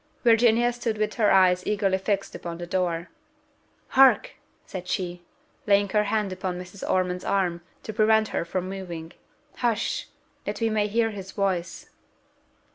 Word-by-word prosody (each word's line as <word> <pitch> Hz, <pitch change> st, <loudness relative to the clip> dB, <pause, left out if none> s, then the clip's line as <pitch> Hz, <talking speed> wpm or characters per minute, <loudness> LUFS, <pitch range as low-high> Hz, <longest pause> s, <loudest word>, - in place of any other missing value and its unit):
Virginia 235 Hz, 0 st, +4 dB
stood 235 Hz, -2 st, -2 dB
with 215 Hz, 0 st, -1 dB
her 215 Hz, -3 st, +3 dB
eyes 185 Hz, -1 st, +5 dB
eagerly 195 Hz, -2 st, +1 dB
fixed 195 Hz, 0 st, -1 dB
upon 170 Hz, -1 st, -6 dB
the 175 Hz, -, -6 dB
door: 175 Hz, -1 st, -1 dB, 0.8 s
"Hark!" 270 Hz, 0 st, +5 dB, 0.3 s
said 180 Hz, -2 st, -7 dB
she, 180 Hz, -2 st, -3 dB, 0.5 s
laying 200 Hz, 0 st, +4 dB
her 210 Hz, +1 st, +2 dB
hand 205 Hz, -2 st, 0 dB
upon 185 Hz, -1 st, -4 dB
Mrs. 180 Hz, +2 st, -10 dB
Ormond's 180 Hz, -1 st, 0 dB
arm, 180 Hz, -3 st, 0 dB, 0.2 s
to 220 Hz, -, -6 dB
prevent 220 Hz, 0 st, +3 dB
her -, -, -1 dB
from 180 Hz, +2 st, -3 dB
moving: 175 Hz, -4 st, -7 dB, 0.4 s
"Hush! 240 Hz, -, -1 dB, 0.4 s
that -, -, -3 dB
we 225 Hz, -1 st, +1 dB
may 210 Hz, -1 st, +1 dB
hear 225 Hz, +1 st, +1 dB
his 195 Hz, -2 st, -8 dB
voice." 190 Hz, -3 st, -2 dB
195 Hz, 150 wpm, -25 LUFS, 180-220 Hz, 0.8 s, eyes